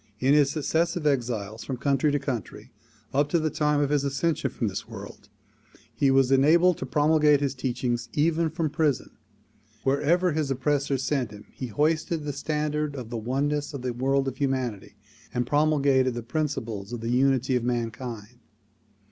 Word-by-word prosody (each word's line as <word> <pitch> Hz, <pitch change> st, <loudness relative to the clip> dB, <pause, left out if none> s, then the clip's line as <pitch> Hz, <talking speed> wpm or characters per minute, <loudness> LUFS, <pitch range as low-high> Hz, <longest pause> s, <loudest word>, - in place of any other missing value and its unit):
In 130 Hz, +4 st, +3 dB
his 145 Hz, -2 st, +5 dB
successive 160 Hz, +3 st, 0 dB
exiles 115 Hz, -6 st, -1 dB
from 130 Hz, -, -4 dB
country 140 Hz, +2 st, +1 dB
to 145 Hz, -, +2 dB
country 130 Hz, -7 st, -5 dB, 0.4 s
up 145 Hz, +2 st, +2 dB
to 170 Hz, -, +2 dB
the 155 Hz, -1 st, 0 dB
time 150 Hz, -1 st, +1 dB
of 145 Hz, 0 st, 0 dB
his 145 Hz, -2 st, +2 dB
ascension 140 Hz, +4 st, 0 dB
from 115 Hz, -, -2 dB
this 95 Hz, -1 st, -5 dB
world, 100 Hz, -2 st, -10 dB, 0.6 s
he 135 Hz, +4 st, +2 dB
was 135 Hz, -1 st, +4 dB
enabled 165 Hz, +6 st, +4 dB
to 130 Hz, -, -4 dB
promulgate 150 Hz, +1 st, +4 dB
his 140 Hz, -2 st, -1 dB
teachings 120 Hz, -2 st, -2 dB
even 165 Hz, +2 st, +2 dB
from 160 Hz, -1 st, -2 dB
prison. 150 Hz, -3 st, 0 dB, 0.7 s
Wherever 160 Hz, +7 st, +2 dB
his 150 Hz, -2 st, -1 dB
oppressors 135 Hz, 0 st, 0 dB
sent 135 Hz, -5 st, 0 dB
him 105 Hz, -1 st, -12 dB
he 130 Hz, -, -6 dB
hoisted 155 Hz, +5 st, 0 dB
the 145 Hz, -1 st, -3 dB
standard 150 Hz, +1 st, -2 dB
of 125 Hz, -4 st, -7 dB
the 120 Hz, -, -3 dB
oneness 145 Hz, +6 st, -1 dB
of 130 Hz, -, -6 dB
the 125 Hz, -1 st, -2 dB
world 135 Hz, +2 st, +1 dB
of 130 Hz, 0 st, -4 dB
humanity 130 Hz, -7 st, -2 dB, 0.4 s
and 120 Hz, 0 st, +1 dB
promulgated 140 Hz, -3 st, +2 dB
the 120 Hz, -, -4 dB
principles 120 Hz, -7 st, -3 dB
of 120 Hz, -, -4 dB
the 115 Hz, +1 st, -2 dB
unity 130 Hz, 0 st, +2 dB
of 125 Hz, -, 0 dB
mankind. 120 Hz, -1 st, -4 dB
140 Hz, 170 wpm, -26 LUFS, 125-150 Hz, 0.7 s, his